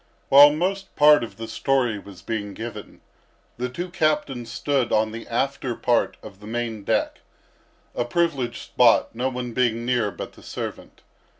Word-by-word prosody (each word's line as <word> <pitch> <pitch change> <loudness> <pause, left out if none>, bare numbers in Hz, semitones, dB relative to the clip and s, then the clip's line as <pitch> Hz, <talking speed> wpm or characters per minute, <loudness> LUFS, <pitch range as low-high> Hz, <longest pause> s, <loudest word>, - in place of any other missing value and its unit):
While 145 +2 +9
most 190 +6 -2
part 150 -3 +6
of 115 - -8
the 115 0 -6
story 120 -2 0
was 95 -4 -13
being 105 -3 -4
given, 110 -2 -8 0.6
the 125 +1 -2
two 175 +7 -6
captains 150 -8 -1
stood 135 -1 0
on 110 0 +2
the 115 +1 -8
after 130 0 -1
part 120 +1 +1
of 100 - -11
the 105 - -12
main 115 -2 -3
deck, - - 0 0.7
a 120 - -1
privileged 130 -3 -1
spot, 120 -2 +3
no 125 +3 -1
one 125 -2 -5
being 120 -2 0
near 120 -4 +1
but 90 - -8
the - - -16
servant. - - -7
120 Hz, 165 wpm, -24 LUFS, 115-140 Hz, 0.7 s, While